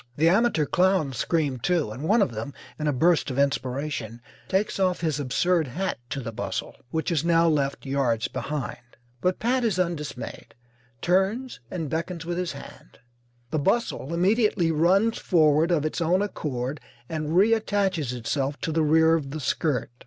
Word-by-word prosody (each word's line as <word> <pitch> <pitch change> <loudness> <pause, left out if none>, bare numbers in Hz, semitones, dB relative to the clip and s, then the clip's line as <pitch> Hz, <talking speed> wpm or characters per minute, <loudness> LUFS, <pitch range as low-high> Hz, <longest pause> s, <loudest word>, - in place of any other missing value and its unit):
The 160 +3 +4
amateur 195 -5 +3
clowns 180 -7 +2
scream, 145 -2 0
too, 165 -4 0
and 120 +5 -7
one 205 +8 +3
of 130 - -2
them, 115 +5 -6 0.2
in 150 - -1
a - - +3
burst 160 +4 +2
of 130 - -4
inspiration, 135 -3 -1 0.3
takes 195 +1 0
off 185 -2 +1
his 155 -4 0
absurd 155 +5 +1
hat 180 +8 -3
to 140 - -3
the 115 - -5
bustle, 110 - -4
which 160 +4 -2
is 165 -2 +1
now 170 0 +4
left 140 -3 0
yards 130 -5 0
behind. 130 +1 -4 0.4
But 180 0 +1
Pat 250 +2 +1
is 215 -6 +1
undismayed, 165 -7 -4 0.5
turns 195 +8 +1
and 165 -4 -4
beckons 165 +3 -3
with 175 +1 -2
his 180 -2 -2
hand. - - -12 0.5
The 155 - 0
bustle 190 - 0
immediately 185 -1 +2
runs 190 +8 +3
forward 155 -2 +3
of 160 -4 +1
its 155 - -2
own 180 +4 +2
accord 140 -8 -4 0.3
and 155 +1 -2
reattaches 200 - +2
itself 135 +4 -2
to 160 - -2
the 160 +1 +1
rear 160 +1 +4
of 155 -4 0
the 155 +3 -5
skirt. 145 -2 -1
160 Hz, 165 wpm, -25 LUFS, 140-180 Hz, 0.5 s, The